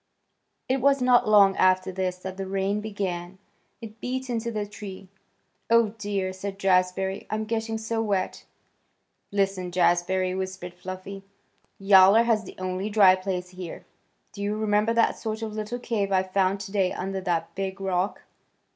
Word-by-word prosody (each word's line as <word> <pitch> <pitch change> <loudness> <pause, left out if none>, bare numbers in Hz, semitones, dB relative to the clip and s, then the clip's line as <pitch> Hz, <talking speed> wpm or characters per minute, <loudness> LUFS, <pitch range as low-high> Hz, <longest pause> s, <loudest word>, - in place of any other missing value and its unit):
It 260 0 0
was 275 +1 +4
not 250 -3 +4
long 200 -2 +6
after 185 0 +3
this 185 -1 -2
that 185 +1 -7
the 195 0 -5
rain 195 +2 -1
began. 190 -4 -4 0.4
It 220 -1 -10
beat 260 0 -3
into 235 0 -2
the 210 -2 -2
tree. 200 -2 -9 0.6
"Oh, 230 -1 +5
dear!" 200 -3 -2
said 195 +1 -6
Jazbury. 190 0 +1
"I'm 215 +1 -2
getting 225 0 -2
so 225 +1 -2
wet." 200 -4 -2 0.9
"Listen, 195 -2 0
Jazbury," 180 +1 +1
whispered 185 -2 -5
Fluffy. 185 +2 -8 0.6
"Yowler 195 +2 +6
has 225 -3 +1
the - - -10
only 185 +2 -3
dry 205 -3 +6
place 185 -1 -3
here. 180 -1 -8 0.5
Do 200 - -9
you 205 +1 -1
remember 215 +1 +1
that 230 - +2
sort 220 0 -4
of 215 -1 -4
little 215 +2 -4
cave 215 -5 -2
I 190 -1 +3
found 190 +1 0
today 195 -2 0
under 190 +1 -4
that 170 -3 -2
big 195 0 -4
rock? 190 0 -1
195 Hz, 155 wpm, -26 LUFS, 185-215 Hz, 0.9 s, long